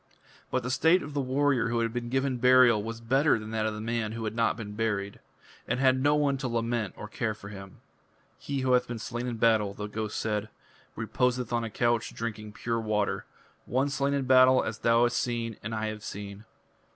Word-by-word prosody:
But 130 - -1
the 125 - -2
state 165 +7 +4
of 145 - -8
the 145 - 0
warrior 135 -1 +1
who 120 0 0
had 115 0 -1
been 120 -1 -3
given 135 0 0
burial 125 -3 +6
was 115 +2 -5
better 135 +6 +3
than 110 0 -7
that 110 -1 0
of 110 - -3
the - - -6
man 115 -1 -2
who 115 0 -5
had 110 - -2
not 115 -2 +1
been 105 -3 -6
buried, 105 -2 -2 0.5
and - - -1
had 130 -1 +3
no 145 +2 +4
one 140 -2 +1
to 135 - -2
lament 115 -3 -1
or 105 - -7
care 110 0 -2
for 100 -2 -11
him. 95 -2 -11 0.6
"He 140 -1 -3
who 130 0 +1
hath 125 0 +3
been 120 - -4
slain 120 +2 -4
in 120 -2 -3
battle," 110 -3 +2
the 105 - -5
ghost 105 0 -4
said, 105 -1 -2 0.5
"reposeth 125 +1 -1
on 120 0 +1
a 115 - -3
couch 120 +1 0
drinking 105 -2 -5
pure 115 +1 -2
water 105 -2 -1 0.4
one 135 +3 +1
slain 140 +1 0
in 140 -2 -1
battle 130 0 +6
as 110 0 -4
thou 115 0 +4
hast 120 0 +2
seen 115 -2 -2
and 110 +2 -4
I 110 0 -2
have 105 -1 -7
seen. 100 0 -7
115 Hz, 220 wpm, -28 LUFS, 110-130 Hz, 0.6 s, burial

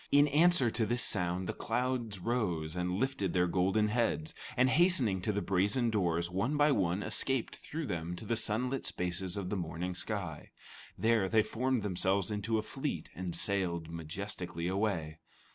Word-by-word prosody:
In 145 +1 +6
answer 150 -4 +4
to 110 - 0
this 120 +2 +3
sound, 90 -2 +1
the - - -3
clouds 120 -3 -2
rose 90 -7 -1
and 90 0 -1
lifted 100 -5 -1
their 90 -1 +3
golden 95 +4 +2
heads, 105 -9 0 0.2
and 125 +1 +5
hastening 130 - +3
to 105 - 0
the 100 -1 -2
brazen 100 +6 +2
doors, 85 -5 +1
one 100 +12 -1
by 145 0 +5
one 95 -5 +1
escaped 135 -3 0
through 160 +1 -5
them 85 -5 -3
to 85 - -9
the 115 - 0
sunlit 125 +4 -1
spaces 90 +1 -2
of 95 -2 -4
the - - 0
morning 85 +1 -3
sky. 90 -5 -4 0.5
There, 110 -4 +2
they 110 -1 +4
formed 125 0 -1
themselves 95 +1 +1
into 105 +2 -1
a 110 - -1
fleet, - - -4
and 90 -1 -4
sailed 85 -5 0
majestically 85 +1 -5
away. 90 -5 -1
100 Hz, 170 wpm, -32 LUFS, 90-115 Hz, 0.5 s, In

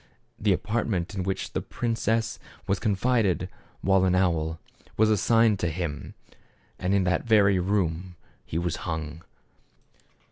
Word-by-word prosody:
The 105 -1 +2
apartment 105 -2 -1
in 95 - -2
which 95 +1 -3
the - - -1
prin 115 -1 -2
cess 115 +1 0 0.3
was 100 - 0
confined 110 -2 +1 0.3
while 95 0 +3
an 90 -1 +3
owl, 80 -3 +1 0.4
was 110 0 +4
assigned 110 0 +3
to 90 - 0
him. 80 -3 -5 0.6
And 95 +2 +1
in 100 - +3
that 90 0 +1
very 100 -4 +5
room 90 -2 -1 0.3
he 80 - -4
was 85 -1 -1
hung. 80 -1 -5
95 Hz, 140 wpm, -26 LUFS, 85-105 Hz, 0.6 s, very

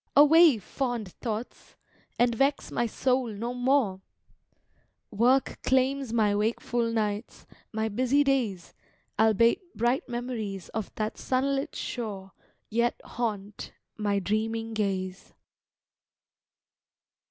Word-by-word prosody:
Away, 300 -1 +7
fond 235 -1 -3
thoughts, 225 +2 -6 0.4
and 240 0 +3
vex 275 +4 0
my 240 - 0
soul 255 +2 +1
no 230 +3 -4
more! 245 -6 +1 1.1
Work 245 +5 +2
claims 265 -1 +1
my 215 -3 +2
wakeful 230 +2 0
nights, 215 0 -2 0.3
my 220 0 -1
busy 255 +6 +2
days 240 -11 -1 0.5
Albeit 220 - +4 0.2
bright 240 +4 +1
memories 230 -6 -4
of 220 -2 -4
that 215 0 -3
sunlit 275 +3 0
shore 200 -5 -5 0.4
Yet 235 +2 0
haunt 210 -4 -4 0.2
my 205 -2 0
dreaming 225 +3 -1
gaze! 195 -3 -3
230 Hz, 100 wpm, -28 LUFS, 210-255 Hz, 1.1 s, Away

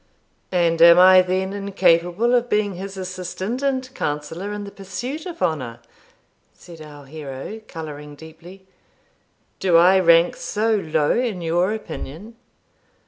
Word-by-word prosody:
'And 170 -2 +1
am 170 0 +8
I 185 +1 +8
then 185 +1 -2
incapable 195 +2 +1
of 245 0 +1
being 210 -1 0
his 190 +2 -8
assistant 185 +5 -5
and 265 -2 -1
counsellor 160 - -4
in 210 0 -5
the 200 - -9
pursuit 240 - -6
of 340 - -6
honour?' 140 -9 -2 0.8
said 170 -3 -14
our 145 -2 -12
hero, 145 +8 -8
colouring 150 -3 -8
deeply. 165 +5 -14 0.9
'Do 180 -3 +3
I 185 +3 +6
rank 170 -1 +4
so 220 +2 -1
low 155 -6 0
in 235 -7 -1
your 175 +4 +1
opinion?' 215 -1 -7
185 Hz, 135 wpm, -21 LUFS, 165-205 Hz, 0.9 s, am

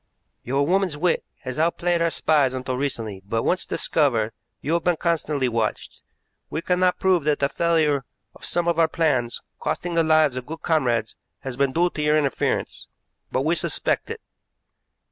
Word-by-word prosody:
"Your 135 +3 0
woman's 180 -2 +1
wit 175 +2 +1 0.2
has 130 +2 -5
outplayed 170 +1 +1
our 170 - +3
spies 145 -5 +2
until 130 0 -3
recently, 115 -7 -3
but, 115 +3 -2
once 185 - 0
discovered, 115 -8 +1 0.3
you 150 - -2
have 170 -1 +1
been 175 -2 +2
constantly 155 -5 0
watched. 115 -2 -2 0.5
We 160 - -4
cannot 180 0 +2
prove 185 -4 +2
that 150 -1 +2
the 140 - +1
failure 155 -3 +1 0.3
of - - -17
some 175 -1 -1
of 170 -1 +1
our 165 - +5
plans, 140 -8 0 0.2
costing 175 -1 -2
the 165 0 +3
lives 155 -4 +3
of 125 - -6
good 160 +2 -7
comrades, 120 -9 +1 0.3
has 130 -2 -5
been 140 +1 +1
due 175 +4 +2
to 150 - -4
your 150 0 +3
interference, 140 -3 -1 0.4
but 130 - 0
we 160 +3 +2
suspect 175 - -1
it. 455 0 -6
155 Hz, 175 wpm, -23 LUFS, 130-170 Hz, 0.5 s, our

